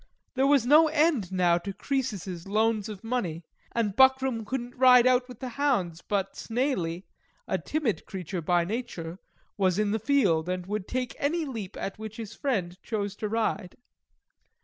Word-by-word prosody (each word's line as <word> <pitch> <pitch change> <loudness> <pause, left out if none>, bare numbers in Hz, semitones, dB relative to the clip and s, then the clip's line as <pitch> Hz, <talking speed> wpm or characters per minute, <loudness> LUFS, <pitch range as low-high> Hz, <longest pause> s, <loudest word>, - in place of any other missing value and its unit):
There 270 +1 +2
was 280 -4 +4
no 305 +5 +7
end 300 - +2
now 175 -2 +3
to 195 +3 -6
Croesus's 200 - -3
loans 215 +1 +1
of 205 -1 -8
money; 195 -9 -2 0.3
and 215 -4 -1
Buckram 265 -3 +4
couldn't 245 -1 -4
ride 250 -1 +7
out 255 0 +3
with 245 - -11
the 255 - -4
hounds, 225 - 0
but 195 0 -2
Snaily 225 - -1 0.4
(a - - 0
timid 295 -9 -2
creature 185 -1 -5
by 175 +1 +2
nature) 190 -5 -5 0.4
was 185 -2 +2
in 210 -1 +1
the 220 - 0
field, 200 - +2
and 180 -1 -2
would 205 0 -4
take 255 -1 -3
any 320 +3 0
leap 225 -9 -6
at 195 - -5
which 220 0 -7
his 225 -3 -7
friend 185 -10 -2
chose 205 -3 -3
to 210 - -3
ride. 215 -4 -1
220 Hz, 170 wpm, -27 LUFS, 185-255 Hz, 0.4 s, no